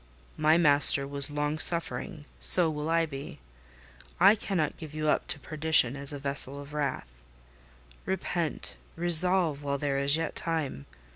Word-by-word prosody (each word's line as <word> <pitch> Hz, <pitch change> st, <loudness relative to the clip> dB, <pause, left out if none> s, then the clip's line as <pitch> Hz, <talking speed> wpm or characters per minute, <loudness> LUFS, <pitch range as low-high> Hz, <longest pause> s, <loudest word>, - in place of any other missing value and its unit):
My 155 Hz, +1 st, +2 dB
Master 145 Hz, -3 st, +4 dB
was 140 Hz, 0 st, +1 dB
long 150 Hz, +1 st, -3 dB
suffering: 165 Hz, -2 st, -2 dB
so 170 Hz, -3 st, +5 dB
will 150 Hz, +1 st, -5 dB
I 165 Hz, 0 st, +1 dB
be. 140 Hz, -3 st, -9 dB, 0.8 s
I -, -, +6 dB
cannot 195 Hz, -7 st, -3 dB
give 155 Hz, -2 st, -11 dB
you 155 Hz, 0 st, -2 dB
up -, -, -1 dB
to 145 Hz, -, -4 dB
perdition 155 Hz, -4 st, 0 dB
as 140 Hz, 0 st, 0 dB
a 145 Hz, -, -6 dB
vessel 140 Hz, 0 st, +2 dB
of 145 Hz, +1 st, -12 dB
wrath: 145 Hz, -, -3 dB, 1.0 s
repent—resolve, 175 Hz, -2 st, -1 dB
while 140 Hz, -1 st, -3 dB
there 140 Hz, -1 st, -2 dB
is 140 Hz, +2 st, +3 dB
yet 165 Hz, -1 st, -4 dB
time. 155 Hz, -, -4 dB
150 Hz, 145 wpm, -27 LUFS, 140-165 Hz, 1.0 s, I